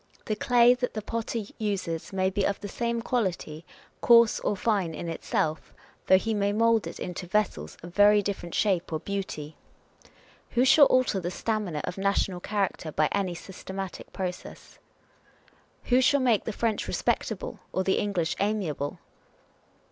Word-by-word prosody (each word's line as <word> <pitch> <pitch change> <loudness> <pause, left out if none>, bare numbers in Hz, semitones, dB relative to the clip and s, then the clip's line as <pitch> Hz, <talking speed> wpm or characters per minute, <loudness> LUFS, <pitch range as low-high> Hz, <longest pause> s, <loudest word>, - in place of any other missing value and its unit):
The 215 - -1
clay 245 +2 +5
that 250 -1 -3
the 215 - -3
potter 230 0 -3 0.2
uses 185 -6 -3
may 190 -1 0
be 200 +1 0
of 200 - 0
the 205 - -6
same 235 +3 -2
quality, 180 -10 -2 0.4
coarse 235 -2 +6
or 205 - -1
fine 190 -6 0
in 170 - -5
itself, 160 -1 -2 0.3
though 190 - +7
he 225 +4 -1
may 205 -1 +1
mould 225 0 +2
it - - -8
into 180 0 -5
vessels 175 - -1
of 175 0 -9
very 205 +1 +5
different 185 -4 -4
shape 190 -6 +1
or 155 - -1
beauty. 185 -7 -5 1.0
Who 250 - +5
shall 275 +2 +7
alter 255 -6 +2
the 175 -1 -3
stamina 200 -6 -2
of 180 - -5
national 195 -2 0
character 195 -5 -2
by 155 0 +1
any 190 -3 -1
systematic 190 +1 -7
process? 180 -2 -7 1.0
W 245 - +3
ho - - +5
shall 285 +2 +4
make 240 -5 +2
the - - -2
French 220 0 -1
respectable, - - -2
or 185 - 0
the 190 - +1
English 180 -6 -1
amiable 190 -9 -1
200 Hz, 160 wpm, -27 LUFS, 180-225 Hz, 1.0 s, though